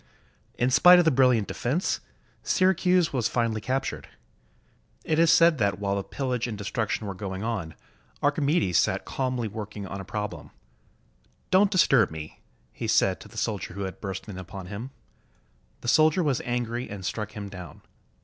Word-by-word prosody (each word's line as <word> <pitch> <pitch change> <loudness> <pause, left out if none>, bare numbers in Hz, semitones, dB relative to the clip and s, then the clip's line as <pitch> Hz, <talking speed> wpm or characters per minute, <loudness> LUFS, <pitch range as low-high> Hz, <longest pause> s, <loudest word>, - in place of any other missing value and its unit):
In 125 +2 +1
spite 180 +7 +8
of 175 - +4
the 160 - +5
brilliant 125 -5 +3
defense, 145 +10 -1 0.4
Syracuse 185 -2 +2
was 125 -4 +1
finally 115 -3 -1
captured. 130 +4 -3 1.0
It 155 0 0
is 165 -1 +5
said 165 -2 +5
that 100 -2 +1
while 100 -1 -1
the 100 - -2
pillage 125 -1 -2
and 110 -3 -5
destruction 110 +1 -2
were 100 - -4
going 95 +1 -5
on, 95 -9 -3 0.5
Archimedes 145 - +2
sat - - 0
calmly 125 -3 -2
working 105 -1 -7
on 100 0 -6
a - - -7
prob 105 +1 -4
lem. - - -11 1.0
"Don't 195 +2 +5
disturb 135 - +4
me," 80 -1 -9 0.3
he - - -5
said - - +2
to - - -12
the - - -14
soldier - - -3
who 100 - -4
had 95 -1 -6
burst 95 -1 -5
in 95 -3 -7
upon 95 +1 -8
him. 105 +7 -6 0.9
The - - -8
soldier 155 +7 +4
was 140 -5 0
angry 120 0 -3
and 100 -2 -7
struck 105 +1 -4
him 105 -3 -6
down. 90 -6 -10
115 Hz, 170 wpm, -26 LUFS, 100-140 Hz, 1.0 s, spite